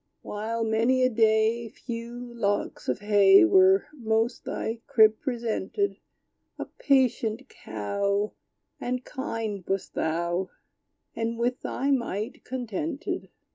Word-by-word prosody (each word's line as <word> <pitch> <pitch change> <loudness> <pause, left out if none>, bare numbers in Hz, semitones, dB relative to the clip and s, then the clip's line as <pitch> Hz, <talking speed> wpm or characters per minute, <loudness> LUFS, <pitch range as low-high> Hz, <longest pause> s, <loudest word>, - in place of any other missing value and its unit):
While, 225 +2 -3
many 230 +4 +2
a 255 - +3
day. 220 +1 +2
Few 235 +1 -7
locks 205 -3 -2
of - - -1
hay 205 +2 +6
Were 380 +2 +5
most 225 -3 -1
thy 225 +1 -3
crib 220 -1 +5
presented, 240 - -2 0.6
A - - -4
patient 255 -3 +1
Cow, 200 - -2 0.5
And 250 0 -3
kind 225 -8 -4
wast 195 0 -2
thou, 170 +3 -1 0.7
And 230 0 -2
with 245 +2 -1
thy 275 +2 -1
mite 230 -5 -2
contented. 260 - -4
230 Hz, 110 wpm, -27 LUFS, 210-250 Hz, 0.7 s, hay